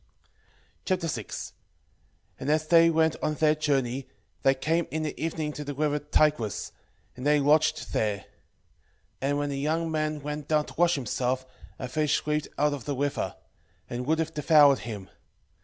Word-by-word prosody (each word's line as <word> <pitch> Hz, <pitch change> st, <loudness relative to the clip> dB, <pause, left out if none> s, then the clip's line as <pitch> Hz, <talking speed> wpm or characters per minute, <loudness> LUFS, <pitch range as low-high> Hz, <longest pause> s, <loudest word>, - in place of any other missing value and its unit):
6:1 165 Hz, -, -2 dB, 0.9 s
And 135 Hz, -, -3 dB
as 155 Hz, +1 st, +2 dB
they 165 Hz, +1 st, +6 dB
went 160 Hz, -1 st, +2 dB
on 155 Hz, -, 0 dB
their 155 Hz, 0 st, +4 dB
journey, 135 Hz, -4 st, -1 dB, 0.3 s
they 135 Hz, 0 st, +4 dB
came 165 Hz, +5 st, 0 dB
in 155 Hz, 0 st, -2 dB
the 155 Hz, 0 st, -4 dB
evening 155 Hz, -2 st, -2 dB
to 150 Hz, -, -6 dB
the 145 Hz, -1 st, -5 dB
river 150 Hz, 0 st, +1 dB
Tigris, 145 Hz, -7 st, +1 dB, 0.4 s
and 125 Hz, -, -8 dB
they 150 Hz, +1 st, +4 dB
lodged 155 Hz, +2 st, +2 dB
there. 105 Hz, -2 st, +1 dB
6:2 -, -, -20 dB, 1.0 s
And 140 Hz, +2 st, +1 dB
when 145 Hz, 0 st, -1 dB
the 135 Hz, -, -3 dB
young 160 Hz, +3 st, 0 dB
man 155 Hz, -2 st, -1 dB
went 150 Hz, 0 st, -5 dB
down 150 Hz, -1 st, +2 dB
to -, -, -11 dB
wash 175 Hz, +1 st, +3 dB
himself, 130 Hz, 0 st, -1 dB, 0.3 s
a 130 Hz, -, -5 dB
fish 150 Hz, +3 st, 0 dB
leaped 150 Hz, 0 st, 0 dB
out 150 Hz, 0 st, +2 dB
of 140 Hz, -5 st, -6 dB
the 145 Hz, -, -2 dB
river, 145 Hz, +2 st, -2 dB, 0.5 s
and 125 Hz, +1 st, -5 dB
would 160 Hz, +1 st, +3 dB
have 160 Hz, 0 st, -2 dB
devoured 150 Hz, -3 st, +5 dB
him. 105 Hz, -5 st, -7 dB
150 Hz, 170 wpm, -27 LUFS, 135-155 Hz, 1.0 s, they